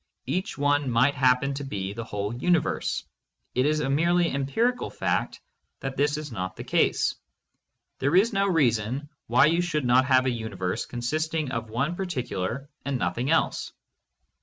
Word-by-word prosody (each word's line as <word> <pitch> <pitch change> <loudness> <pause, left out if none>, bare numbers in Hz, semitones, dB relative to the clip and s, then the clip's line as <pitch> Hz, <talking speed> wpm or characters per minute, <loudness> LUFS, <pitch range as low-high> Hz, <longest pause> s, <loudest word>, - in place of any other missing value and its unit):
Each 185 +4 -2
one 145 -1 +2
might 125 +4 +3
happen 130 +1 +2
to 140 +1 -4
be 100 -7 -4
the 115 +2 -5
whole 105 -1 -3
universe; 160 +7 0 0.5
it 130 +3 +2
is 155 0 +1
a 135 - -1
merely 170 +4 +3
empirical 225 - 0
fact - - -1 0.4
that 135 -1 -4
this 145 +1 +1
is 155 -2 -6
not 95 -3 -4
the - - -7
case. - - +2 0.9
There 140 +5 +1
is 210 +5 +4
no 195 0 +2
reason 130 - +1 0.2
why 120 +2 +5
you 165 +3 +3
should 155 -6 -1
not 125 +2 +5
have 130 -1 +4
a 130 - +2
uni 110 -3 -5
verse 90 0 -2
consisting 155 +4 -2
of 115 -3 -3
one 140 +10 -1
particular 135 - -3 0.2
and 140 -1 -1
nothing 125 +2 -1
else. 165 0 +1
135 Hz, 165 wpm, -26 LUFS, 120-155 Hz, 0.9 s, why